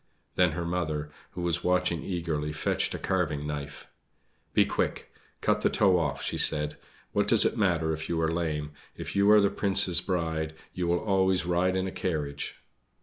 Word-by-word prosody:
Then 90 -3 +3
her 85 +1 -3
mother, 80 -4 -2 0.2
who 90 - -5
was 85 0 -1
watching 90 -2 +1
eagerly, 80 -5 -3
fetched 75 - -1
a - - -3
carving 80 -6 -1
knife. 75 -1 -6 0.7
"Be - - +5
quick, - - -3 0.3
cut - - +1
the - - +3
toe 95 -4 +3
off," 75 -5 -2
she - - -2
said; 75 -1 +2 0.4
"what - - +1
does - - +6
it - - +1
matter 85 -6 +1
if 80 0 -6
you 85 -1 0
are 80 - +2
lame 75 -3 -2 0.2
if - - -7
you 100 +1 +4
are 105 0 +8
the 100 -1 +2
Prince's 95 -3 +3
bride 80 -4 -2 0.2
you 90 -1 -2
will 85 0 +2
always 95 -3 +1
ride 90 +1 +1
in 95 0 0
a 95 - -4
carriage!" 75 -7 -4
85 Hz, 185 wpm, -28 LUFS, 80-90 Hz, 0.7 s, are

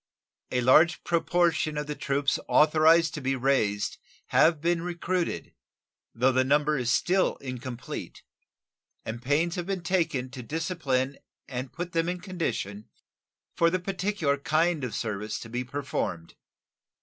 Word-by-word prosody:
A 125 - +1
large 150 +7 +5
proportion 170 -2 +1
of 150 - -2
the 150 - -3
troops 140 0 0
authorized 160 +2 +5
to 150 - -5
be 135 +1 0
raised 120 -6 0 0.3
have 160 -1 +4
been 170 +2 +1
recruited, 175 0 -2 0.6
though 125 +3 +3
the 130 0 +3
number 150 +3 +2
is 125 -4 -1
still 185 +6 +2
incomplete, 125 -2 -7 0.8
and 115 +1 -5
pains 155 +7 +1
have 175 0 -3
been 190 -3 -2
taken 165 -8 0
to 130 - -7
discipline 140 -2 -2 0.3
and 130 -1 -5
put 175 +4 -5
them 165 +1 0
in 180 0 -3
condition 165 - -4 0.6
for 170 - +3
the 185 - +1
particular 185 -5 -1
kind 155 +1 +1
of 125 - -3
service 105 -1 -3
to 115 - -9
be 125 +2 -2
performed. 125 -11 -4
150 Hz, 140 wpm, -27 LUFS, 130-170 Hz, 0.8 s, large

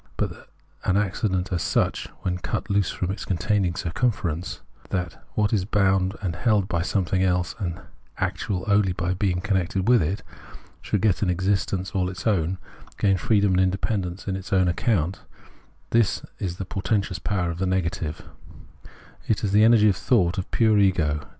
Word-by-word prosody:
But - - 0
that - - -13 0.4
an 95 - +2
accident 95 -2 0
as 85 - 0
such, - - 0
when 90 -1 -2
cut 100 - -3
loose 100 -2 +2
from 90 0 -2
its 100 - -5
containing 95 0 0
circmnference, 90 0 -2
— - - -25
that 90 -3 -3
what 105 0 +1
is 100 -4 +2
bound 95 -1 +2
and 90 -3 -1
held 105 0 +2
by 85 -4 0
something 95 0 0
else 90 -1 +1
and 90 -3 -3 0.4
actual 90 -3 -2
only 100 -3 +3
by 90 0 -1
being 90 -1 0
connected 95 -1 0
with 120 -1 +6
it, 90 +7 -2 0.3
— - - -20
should 105 - -1
get 100 -4 +2
an 100 - +1
existence 95 +1 0
all 95 -3 0
its 90 -1 -8
own, 95 -4 +1 0.4
gain 100 -2 +3
freedom 100 +1 +2
and 90 0 +3
independence 95 0 -1
on 95 - -1
its 95 +2 -7
own 95 -2 +4
account 90 -1 0 0.3
— - - -32
this 115 -2 +2 0.2
is 90 -3 -3
the 95 - -4
portentous 100 0 -1
power 90 -5 -1
of 85 - -7
the 95 - 0
negative; 85 -4 -2 1.0
it 110 - 0
is 100 - 0
the 105 +2 +5
energy 110 -1 +6
of 100 - +3
thought, 95 -4 +2
of 95 - -5
pure 110 -3 +3
ego. 80 -7 +2
95 Hz, 180 wpm, -24 LUFS, 90-100 Hz, 1.0 s, with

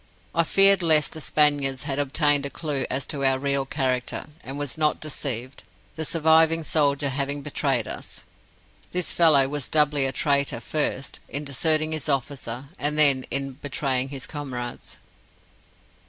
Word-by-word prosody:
I 170 - +3
feared 195 +2 +5
lest 155 -3 +4
the 160 - -8
Spaniards 145 -3 +2
had 140 -2 -3
obtained 145 0 +1
a - - -7
clue 145 -3 -3
as 130 +1 -2
to 140 -2 -4
our 135 -1 +3
real 140 0 -1
character, 130 -3 -2 0.2
and 135 +2 -6
was 145 -3 -1
not 155 -1 0
deceived 130 -4 -3 0.3
the 160 -1 -3
surviving 160 +1 +3
soldier 145 -2 +1
having 140 +1 -3
betrayed 135 -6 -1
us. - - -8 0.7
This 180 -1 0
fellow 150 -6 +5
was 145 -1 -4
thus - - -8
doubly 145 -2 +3
a - - -2
traitor 140 -2 0
first, 140 +2 -3
in 145 +2 -4
deserting 155 +3 +2
his 155 -1 -3
officer, 135 -2 -3
and 150 +1 0
then 140 -4 +4
in 135 0 -2
betraying 135 -1 -2
his 135 -1 -6
comrades. 125 -5 -7
140 Hz, 155 wpm, -24 LUFS, 135-155 Hz, 0.7 s, feared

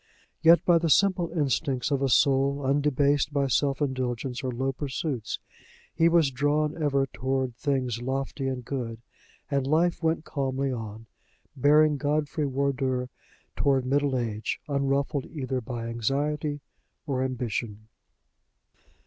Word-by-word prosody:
Yet 165 +1 +6
by 170 -2 +5
the 165 0 0
simple 185 -1 +3
instincts 140 -4 0
of 140 -1 +1
a 135 - +1
soul 140 +2 +3
undebased 145 0 +2
by 140 -1 +1
self 135 +2 +1
indulgence 130 -1 -2
or 130 - -1
low 130 +2 -1
pursuits, 135 -3 -3 0.6
he 165 0 +4
was 165 -5 +3
drawn 145 +3 +1
ever 140 -2 +2
toward 130 -1 -2
things 130 -5 -1
lofty 135 +1 -3
and 130 -2 -3
good; 115 -4 -4 0.5
and 140 -1 0
life 165 +4 +2
went 160 -1 0
calmly 135 -1 -1
on, 110 -2 -6 0.5
bearing 150 +2 +4
Godfrey 150 +1 -1
Wardour 130 -2 -1 0.5
toward 135 -2 +2
middle 140 0 +1
age, 110 -3 -3
unruffled 140 -1 0
either 130 -4 -3
by 115 0 -5
anxiety 145 +6 -1 0.4
or 135 -4 -1
ambition. 115 -4 -3
135 Hz, 130 wpm, -27 LUFS, 130-145 Hz, 0.6 s, Yet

